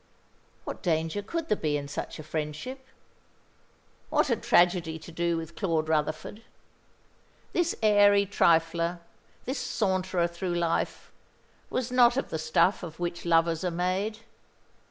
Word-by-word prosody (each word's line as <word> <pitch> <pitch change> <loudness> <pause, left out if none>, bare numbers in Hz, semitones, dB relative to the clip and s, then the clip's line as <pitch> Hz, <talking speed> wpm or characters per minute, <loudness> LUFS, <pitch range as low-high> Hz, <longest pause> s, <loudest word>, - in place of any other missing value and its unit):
What - - -6
danger 165 +3 0
could 325 +10 -4
there 210 - +2
be 150 -6 -1
in 140 -1 -5
such 140 - -5
a 155 - -8
friendship? 155 - -5 1.2
What - - +2
had 235 - 0
tragedy 175 -7 +3
to 160 - -11
do 170 0 0
with 165 0 -7
Claude 160 -4 -1
Rutherford? 155 +7 -1 1.1
This 345 -1 +1
airy 205 -1 +5
trifler, 170 -2 +2 0.4
this 260 +1 -2
saunterer 185 -4 0
through 175 +1 -4
life, 170 -1 -1 0.6
was 250 -1 -2
not 245 0 +5
of 270 - -2
the 160 - -2
stuff 160 +5 +2
of 170 -3 -8
which 175 0 -4
lovers 165 0 +2
are 180 - +1
made. 185 +5 -2
175 Hz, 135 wpm, -28 LUFS, 165-205 Hz, 1.2 s, airy